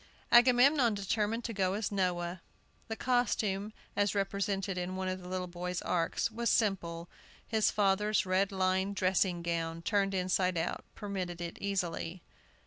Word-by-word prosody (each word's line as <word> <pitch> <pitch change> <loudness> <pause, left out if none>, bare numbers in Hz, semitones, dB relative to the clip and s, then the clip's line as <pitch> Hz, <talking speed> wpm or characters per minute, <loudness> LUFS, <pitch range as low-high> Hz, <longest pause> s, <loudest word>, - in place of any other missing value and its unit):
Agamemnon 245 0 +6
determined 210 +3 -1
to 230 - -4
go 190 -2 +1
as 215 +1 -2
Noah. 180 -2 -1 0.5
The 225 - -3
costume, 215 -5 0 0.2
as 205 0 +1
represented 195 0 -1
in 180 +1 -3
one 190 0 -2
of 185 0 -3
the 180 - -10
little 185 0 -2
boys' 180 0 -4
arks, 170 +6 0
was 235 +1 -1
simple. 175 -6 0 0.4
His 220 -1 +2
father's 210 +1 +2
red 190 +2 +1
lined 190 +1 +1
dressing 185 -2 +1
gown, 165 -1 -2
turned 195 0 +1
inside 185 -1 +1
out, 165 +1 -2
permitted 185 -4 -4
it 170 -1 -6
easily. 180 -3 -2
190 Hz, 145 wpm, -32 LUFS, 180-210 Hz, 0.5 s, Agamemnon